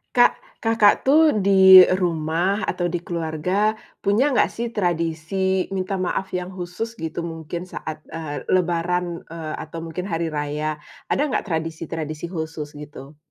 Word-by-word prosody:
Kak, 245 - +5 0.2
Kakak 225 -2 +5
tuh 305 +3 +5
di 190 -1 +9 0.2
rumah 170 +4 0
atau 175 - -1
di 175 0 -2
keluarga 175 +5 -1 0.2
punya 220 +8 +2
nggak 260 - +3
sih 235 +1 -2
tradisi 180 0 0
minta 190 +1 -2
maaf 190 +2 -2
yang 180 +1 -6
khusus 185 +5 -5
gitu 160 +1 -3
mungkin 165 +1 -6
saat, 160 -3 -6 0.2
eee, 155 -3 -5
lebaran, 175 -1 0
eee, 160 -2 -6
atau 165 +1 -7
mungkin 165 +2 -5
hari 165 -3 -2
raya. 150 0 -2 0.3
Ada - - +1
nggak - - -1
tradisi-tradisi 160 -1 -4
khusus 160 -3 -5
gitu? 145 0 -11
175 Hz, 140 wpm, -22 LUFS, 160-190 Hz, 0.3 s, di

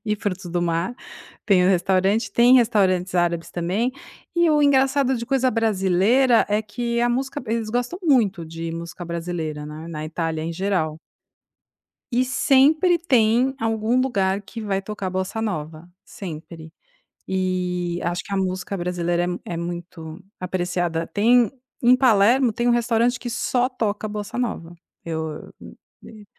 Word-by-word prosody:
e 210 - +1
frutos 195 -2 -4
do 175 0 -1
mar, 170 +6 -1 0.5
tem 185 -4 +4
o - - +4
restaurante. 195 +3 +2
Tem 240 +3 +6
restaurantes 195 -7 +3
árabes 170 -1 0
também. 185 +8 -1 0.5
E 345 0 +4
o 300 -1 +3
engraçado 270 -1 +3
de 235 0 -5
coisa 265 -1 +2
brasileira 225 +3 +3
é 210 +1 +1
que 235 +2 -2
a 240 - +2
música 270 +4 -2
eles 225 -1 -2
gostam 245 +9 -2
muito 215 - +2
de 165 +1 -6
música 170 +2 -7
brasileira, 165 -3 -4
né, 155 +2 -8
na 155 -2 -5
Itália 160 0 -3
em 165 - -3
geral. 180 -4 -1 1.2
E 250 +2 +2
sempre 295 +7 +3
tem 250 -4 +2
algum 225 +1 +1
lugar 195 -7 0
que 205 +3 -9
vai 200 -3 -1
tocar 195 -1 -5
bossa 190 +4 -3
nova, 160 -5 -5 0.2
sempre. 160 -2 -9 0.5
Eh, 180 -2 -1
acho 175 +1 -1
que - - -10
a - - +1
música 185 +1 -2
brasileira 175 -1 -1 0.2
é - - -5
é - - -4
muito 170 0 -7 0.2
apreciada. 175 -2 -2
Tem, 235 +4 +3 0.3
em 250 +1 +6
Palermo, 245 0 +4
tem 240 +3 0
um - - +5
restaurante 240 +1 +1
que 240 0 -6
só 245 +1 0
toca 215 -4 -2
bossa 210 0 -5
nova. 175 -9 -3 0.3
Eu 160 -2 -5 0.5
eu 215 -2 -13
200 Hz, 150 wpm, -22 LUFS, 175-240 Hz, 1.2 s, Tem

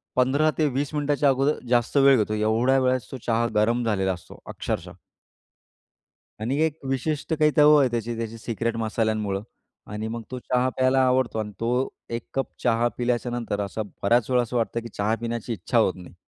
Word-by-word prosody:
15-20 145 +1 +1
मिनिटाच्या 145 -1 +2
अगोदर 135 +3 +1
जास्त 120 +2 +2
वेळ 135 -1 +6
घेतो, 105 0 0
एवढ्या 115 +5 +2
वेळेस 130 -1 +1
तो 130 - -5
चहा 115 0 +2
गरम 115 +3 +2
झालेला 95 -4 +1
असतो, 90 - -12
अक्षरशः. - - -4 1.5
आणि, 125 +6 -1
एक 160 -1 +1
विशिष्ट 150 +4 -1
काही 155 -1 +3
चव 150 0 +7
आहे 135 -3 +3
त्याची 120 0 -2
त्याची 115 0 -5
सिक्रेट 115 +1 -3
मसाल्यांमुळं, 110 -3 -1 0.5
आणि 105 +1 -4
मग 115 +1 -4
तो 125 - -4
चहा 125 +1 +1
प्यायला 130 +1 +3
आवडतो 125 -3 +1
आणि 105 -1 -4
तो 115 - -1 0.4
1 115 0 -4
कप 135 -1 -1 0.2
चहा 120 0 +3
पिल्याच्यानंतर 120 -3 -1
असं 100 +2 -3 0.2
बऱ्याच 115 +3 +3
वेळा 125 -1 +3
असं 120 +1 -3
वाटतं 115 0 -1
की, 115 - -8
चहा 105 +2 0
पिण्याची 115 0 -3
इच्छा 115 +4 -2
होत 110 -5 +4
नाही. 90 -1 -12
120 Hz, 175 wpm, -25 LUFS, 110-130 Hz, 1.5 s, चव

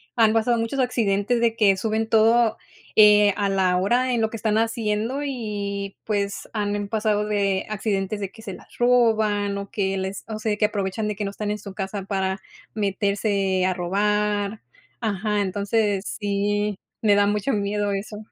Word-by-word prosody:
han 225 -3 +4
pasado 230 +1 +2
muchos 230 +4 -2
accidentes 235 -2 +1
de 230 -1 +2
que 205 -4 +4
suben 220 +2 -1
todo, 225 0 +4 0.4
eh, 210 -1 +7
a 200 -1 +1
la 190 -2 +2
hora, 245 +7 +1
en 235 - +1
lo 220 - +1
que 225 - -5
están 215 0 0
haciendo 225 +3 -1
y, 205 -7 -4
pues, 200 -2 -2
han 205 -1 -2
pasado 210 -1 0
de 200 -2 0
accidentes 205 -1 -2
de 195 -2 -4
que 220 - -14
se 195 - -7
las - - -14
roban, 220 -4 +2
o 200 0 -7
que 195 -3 -1
les 190 +1 -4
o 220 -1 -5
sea, 215 -1 0
que 210 - +3
aprovechan 205 0 -2
de 210 - -2
que 210 - -4
no - - -2
están 205 +1 -3
en 210 - -3
su 200 -1 -10
casa 195 0 -4
para 190 -1 -2 0.3
meterse 200 -2 0
a 185 - +1
robar. 205 +3 0 0.4
Ajá, 210 -1 0
entonces 205 +1 0
sí, 205 0 0 0.3
me 210 -2 +4
da 205 0 +4
mucho 210 +5 0
miedo 205 0 -1
eso. 200 +2 -4
210 Hz, 175 wpm, -23 LUFS, 200-220 Hz, 0.4 s, eh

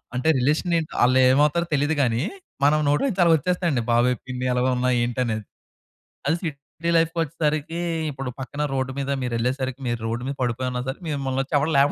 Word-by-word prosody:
అంటే 130 +5 +1
రిలేషన్ 155 +6 +1
ఏంటి 155 - -6
అలేమవుతారో 135 +6 +4
తెలీదు 145 +3 +1
గాని, 120 +1 +1 0.4
మనం 155 +1 +4
నోట్లో 145 - +2
నుంచి 190 -4 0
అలా 165 - +6
ఒచ్చేస్తాయండి. 170 -5 0
బాబయ్, 125 +1 +3
పిన్ని 125 0 -3
ఎలాగున్నావు 125 0 +1
ఏంటనేది. 120 -3 -1 0.8
అది 160 +4 +2
సిటీ 155 +2 -4
లైఫ్‌కొచ్చేసరికి, 165 -1 -1 0.3
ఇప్పుడు 135 -2 -5
పక్కన 140 +2 -4
రోడ్ 130 0 -1
మీద 140 0 -2
మీరేళ్ళేసరికి, 125 +2 -2
మీరు 120 -1 -2
రోడ్ 120 +2 -3
మీద 140 - -3
పడిపోయున్న 125 +1 -2
సరే 135 - -3
మిమ్మల్నోచ్చి 135 0 -2
ఎవరు 155 +3 0
లేపడండి - - +7
135 Hz, 155 wpm, -24 LUFS, 125-155 Hz, 0.8 s, లేపడండి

